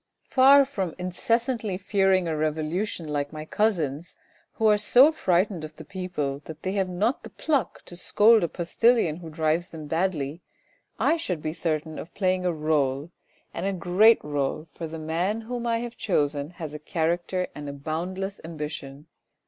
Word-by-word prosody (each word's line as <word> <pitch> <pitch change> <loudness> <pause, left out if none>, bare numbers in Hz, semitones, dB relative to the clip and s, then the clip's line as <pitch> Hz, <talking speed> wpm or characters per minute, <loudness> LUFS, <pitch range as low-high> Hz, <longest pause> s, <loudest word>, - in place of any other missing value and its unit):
Far 275 +1 +7
from 195 - -3
incessantly 225 +3 -1
fearing 190 -2 +2
a 160 - -1
revolution 155 +4 -1
like 145 -1 -2
my 155 0 -7
cousins 165 -6 -1 0.4
who 225 - -1
are 210 -1 +6
so 250 +8 +6
frightened 185 - +1
of 155 0 -8
the - - -11
people 180 -8 -3
that 160 - -10
they 185 - -1
have 195 -2 0
not 210 +9 0
the - - -10
pluck 280 - -1
to 175 - -9
scold 215 +4 +4
a - - +2
postillion 175 0 +2
who 170 -2 -9
drives 160 +2 0
them 155 -2 -8
badly, 160 -1 -1 0.6
I 335 - +2
should 185 - -3
be 155 - -2
certain 160 -2 -2
of 165 - -10
playing 185 -2 +1
a - - +2
role 150 -1 0 0.4
and 170 - -4
a 195 - 0
great 190 +5 +4
role, 145 +1 -2
for 165 - -6
the 160 +1 -7
man 170 +8 -1
whom 240 +1 -4
I 230 0 +1
have 240 0 -7
chosen 145 -6 0
has 155 -3 -6
a 150 - -6
character 175 +4 -1
and 145 -1 -7
a - - -5
boundless 180 +7 -4
ambition. 150 -3 -6
175 Hz, 175 wpm, -26 LUFS, 155-200 Hz, 0.6 s, Far